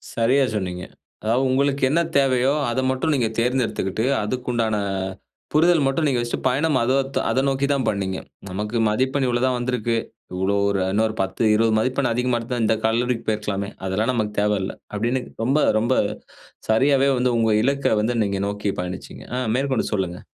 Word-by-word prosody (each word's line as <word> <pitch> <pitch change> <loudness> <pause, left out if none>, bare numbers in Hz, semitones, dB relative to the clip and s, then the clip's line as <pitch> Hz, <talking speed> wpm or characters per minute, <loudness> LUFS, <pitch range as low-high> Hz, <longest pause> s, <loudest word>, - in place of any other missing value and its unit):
சரியா, 125 +4 +3
சொன்னீங்க. 90 -3 -3 0.4
அதாவது 115 +4 +1
உங்களுக்கு 140 +1 +1
என்ன 165 +5 +2 0.2
தேவையோ 135 -1 +3 0.2
அத 120 - -1
மட்டும் 130 +5 0
நீங்க 120 -4 +1
தேர்ந்தெடுத்துக்குட்டு, 115 -4 0 0.2
அதுக்கு 125 +4 -4
உண்டான 115 -2 0 0.8
புரிதல் 165 0 +4
மட்டும் 135 +4 +1
நீங்க 130 -4 +1
வச்சுட்டு 120 0 -3
பயணம் 140 +3 +1
அதத் 135 +3 0
அத - - +1
நோக்கி 135 +1 0
தான் 135 -2 0
பண்ணீங்க. 95 -2 -2 0.3
நமக்கு 105 +5 -3
மதிப்பெண் 130 +5 0
இவ்வளோ 120 -1 0
தான் 130 -1 +1
வந்திருக்கு. 120 -2 -1 0.4
இவ்வளோ 95 +2 0
ஒரு 100 -1 0
இன்னொரு 110 +1 +1
10 95 +2 -3
20 115 +1 +2
மதிப்பெண் 130 +2 0
அதிகமா 125 0 0
இருந்தா 120 +1 -3
இந்த 110 0 +3
கல்லூரிக்கு 115 +1 0
போயிருக்கலாமே. 105 -2 -2 0.2
அதெல்லாம் 105 +6 0
நமக்கு 110 -3 -1
தேவயில்ல 105 -2 0 0.2
அப்படின்னு 120 +5 0 0.2
ரொம்ப, 135 +5 +2 0.2
ரொம்ப 120 +4 +1 0.8
சரியாவே 135 +4 +4
வந்து 125 -1 +1
உங்க 115 -1 +2
இலக்க 140 -2 +1
வந்து 120 +3 0
நீங்க 100 -1 -2
நோக்கி 105 0 -2
பயணிச்சீங்க. 90 0 -7
ஆ - - 0 0.2
மேற்கொண்டு 135 -2 0
சொல்லுங்க. 90 -3 -2
120 Hz, 160 wpm, -22 LUFS, 105-130 Hz, 0.8 s, புரிதல்